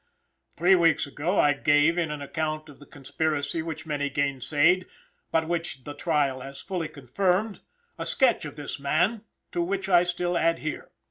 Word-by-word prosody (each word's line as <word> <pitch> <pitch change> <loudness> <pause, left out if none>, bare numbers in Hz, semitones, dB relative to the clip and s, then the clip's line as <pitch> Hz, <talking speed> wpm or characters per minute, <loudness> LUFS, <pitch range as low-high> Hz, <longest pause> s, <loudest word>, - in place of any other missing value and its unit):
Three 180 +3 +5
weeks 170 -4 +4
ago 150 +7 -1
I 145 - +5
gave, 145 +3 +3
in 170 -3 0
an 150 -1 -5
account 155 +1 -3
of 145 - -14
the 145 - -14
conspiracy 145 +2 -2
which 160 -1 -6
many 145 -2 -1
gainsayed, 145 +6 +2 0.4
but 160 0 +1
which 165 -6 -3
the 145 - -7
trial 145 -3 0
has 135 +1 -8
fully 180 -4 -3
confirmed, 180 - -1 0.4
a - - -3
sketch 255 -4 +3
of 150 - -7
this 145 -1 -6
man, 180 +11 +1 0.3
to 175 - -1
which 195 +2 -2
I 175 -2 +6
still 175 0 -1
adhere. 165 -2 -1
160 Hz, 165 wpm, -26 LUFS, 145-175 Hz, 0.4 s, I